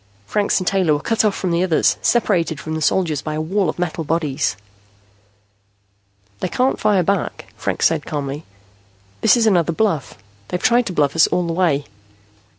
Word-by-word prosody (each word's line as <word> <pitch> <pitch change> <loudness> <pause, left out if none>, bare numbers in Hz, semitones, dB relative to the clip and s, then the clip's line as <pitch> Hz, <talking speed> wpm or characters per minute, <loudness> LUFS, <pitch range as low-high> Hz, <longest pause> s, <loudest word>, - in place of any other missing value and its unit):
Franks 205 - 0
and 185 - -4
Taylor 185 -5 +2
were 145 - 0
cut 225 +9 0
off 210 -2 +1
from 185 - -2
the 170 +1 +1
others, 180 -4 +2
separated 175 - +1
from 155 - -6
the 160 - -3
soldiers 155 -2 +1
by 155 -1 -4
a - - -2
wall 180 +3 0
of - - -4
metal 175 -2 -2
bodies. 150 - -1 1.8
"They 185 - -2
can't 255 +8 0
fire 205 -4 +2
back," 195 0 -2
Franks - - -1
said - - +2
calmly. 145 0 -4 0.8
"This - - +5
is 230 - +2
another 175 -5 +2
bluff. 165 - -1 0.3
They've 180 - -3
tried 240 +4 +2
to 185 - -4
bluff 145 -3 +1
us 160 - +5
all 180 - 0
the 165 - -2
way." 165 -5 +1
170 Hz, 180 wpm, -20 LUFS, 155-195 Hz, 1.8 s, This